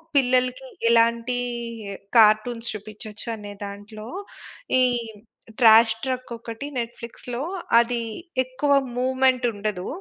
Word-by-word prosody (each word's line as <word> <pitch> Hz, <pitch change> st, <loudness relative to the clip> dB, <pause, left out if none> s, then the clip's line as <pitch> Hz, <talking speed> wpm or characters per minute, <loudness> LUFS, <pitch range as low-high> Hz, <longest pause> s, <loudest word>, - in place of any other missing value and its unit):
పిల్లలకి 255 Hz, 0 st, +2 dB, 0.2 s
ఎలాంటి 235 Hz, +1 st, +3 dB, 0.8 s
కార్టూన్స్ 225 Hz, +2 st, +4 dB
చూపించొచ్చు 215 Hz, +1 st, -7 dB
అనే 205 Hz, -1 st, -9 dB
దాంట్లో, 210 Hz, +2 st, -9 dB, 0.7 s
ఈ -, -, +5 dB, 0.8 s
'ట్రాష్ 225 Hz, -1 st, +7 dB
ట్రక్' 255 Hz, -2 st, -3 dB
ఒకటి 230 Hz, +4 st, -7 dB
నెట్‌ఫ్లిక్స్‌లో. 235 Hz, +2 st, -6 dB, 0.4 s
అది 235 Hz, 0 st, +1 dB, 0.4 s
ఎక్కువ 265 Hz, +3 st, -2 dB, 0.3 s
మూవ్‌మెంట్ 260 Hz, -1 st, +2 dB
ఉండదు. 205 Hz, -3 st, -3 dB
235 Hz, 90 wpm, -24 LUFS, 215-255 Hz, 0.8 s, ట్రాష్